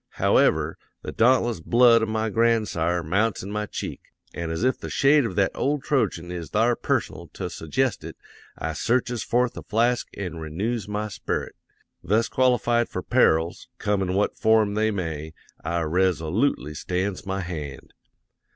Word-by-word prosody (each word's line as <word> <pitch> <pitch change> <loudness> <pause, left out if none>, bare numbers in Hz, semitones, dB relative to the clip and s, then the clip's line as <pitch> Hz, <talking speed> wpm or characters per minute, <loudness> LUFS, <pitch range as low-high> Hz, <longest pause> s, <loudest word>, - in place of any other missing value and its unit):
However, - - +2 0.2
the - - -5
dauntless 120 -3 +3
blood 115 +6 +5
of 110 - -1
my 110 0 -1
grandsire 105 -7 +1
mounts 100 +6 0
in 100 - -6
my 105 0 -2
cheek; - - -6 0.3
an' 85 -1 -4
as 80 +6 -3
if 130 +1 +1
the - - -6
shade 140 0 +4
of - - -7
that 100 -2 +2
old 145 0 -1
Trojan 90 - 0
is 85 -2 -6
thar 115 +3 +2
personal - - -2
to - - -5
su'gest 120 +8 -1
it, - - -8 0.4
I 80 +1 -3
searches 120 +6 0
forth 125 0 0
a - - -5
flask 120 +3 +1
an' 90 -4 -5
renoos 100 +9 -3
my 105 +1 -2
sperit; 85 -5 -4 0.5
thus 110 +5 +1
qualified 120 -2 +2
for - - -4
perils, 80 +2 +2
come 105 -2 0
in 95 -1 -1
what 100 - +1
form 110 -2 +3
they 110 +1 +1
may, 80 -6 -4 0.3
I 85 +1 -1
resolootely 85 - 0
stands 95 +5 -3
my 95 0 -2
hand. 75 -6 -7
105 Hz, 160 wpm, -24 LUFS, 85-115 Hz, 0.5 s, blood